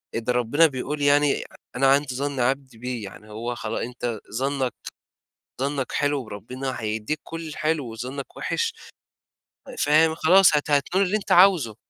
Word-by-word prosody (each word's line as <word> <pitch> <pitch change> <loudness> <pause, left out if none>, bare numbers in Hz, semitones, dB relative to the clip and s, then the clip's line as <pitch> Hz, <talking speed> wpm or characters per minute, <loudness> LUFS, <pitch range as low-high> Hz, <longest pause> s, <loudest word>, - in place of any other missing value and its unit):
إد 115 +2 -3
ربنا 125 +7 +4
بيقول 145 +2 -4
يعني 145 0 +3 0.3
أنا 135 +2 +3
عند 140 +1 +3
ظَن 140 +1 -3
عبدي 130 0 -1
بي. 125 0 -4
يعني 105 +2 -11
هو 120 +3 -4
خلاص 110 -2 -4
أنت 120 -2 -4
ظنّك 130 0 -1 0.9
ظنّك 135 -1 -2
حلو 145 -2 0
وربنا 125 +5 -6
هيدّيك 110 +7 -3
كل 165 -1 -7
الحلو 155 -5 -2
وظنّك 130 +4 -7
وِحِش. 455 -1 -1 1.1
فاهم؟ 160 +2 +4
خلاص 180 +1 +5
هت 145 0 -2
هتنول 175 +7 +2
اللي 200 +4 +1
أنت 205 - -7
عاوزه. 175 - +5
135 Hz, 145 wpm, -24 LUFS, 120-150 Hz, 1.1 s, خلاص